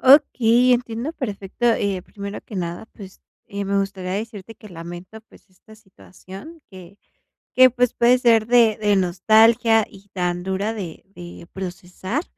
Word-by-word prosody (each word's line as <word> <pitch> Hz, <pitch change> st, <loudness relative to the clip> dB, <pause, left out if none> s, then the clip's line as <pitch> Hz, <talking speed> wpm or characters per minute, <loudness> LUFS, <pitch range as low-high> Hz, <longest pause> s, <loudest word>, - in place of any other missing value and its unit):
Okey, 255 Hz, -3 st, +5 dB
entiendo 240 Hz, +4 st, -4 dB
perfecto, 210 Hz, -, -6 dB
eh, 200 Hz, -5 st, +1 dB
primero 200 Hz, +2 st, -8 dB
que 215 Hz, -, -12 dB
nada, 175 Hz, 0 st, -4 dB
pues 195 Hz, -3 st, -13 dB, 0.3 s
eh, 200 Hz, 0 st, -5 dB
me 200 Hz, 0 st, 0 dB
gustaría 190 Hz, -2 st, -3 dB
decirte 220 Hz, +1 st, -6 dB
que 215 Hz, -, -14 dB
lamento, 175 Hz, +4 st, -10 dB
pues, 220 Hz, -, -22 dB
esta 185 Hz, +4 st, -19 dB
situación 195 Hz, -, -14 dB
que 185 Hz, +1 st, -14 dB, 0.5 s
que 255 Hz, 0 st, +7 dB
pues, 250 Hz, -1 st, 0 dB
puede 240 Hz, +1 st, +4 dB
ser 230 Hz, -3 st, +3 dB
de 235 Hz, -2 st, +4 dB
de 205 Hz, -1 st, +2 dB
nostalgia 220 Hz, +5 st, +4 dB
y 200 Hz, +1 st, -17 dB
tan 175 Hz, -1 st, -2 dB
dura 190 Hz, +3 st, -2 dB
de 180 Hz, -7 st, -8 dB
de 175 Hz, -1 st, -11 dB
procesar, 185 Hz, -, -5 dB
205 Hz, 150 wpm, -21 LUFS, 185-230 Hz, 0.5 s, que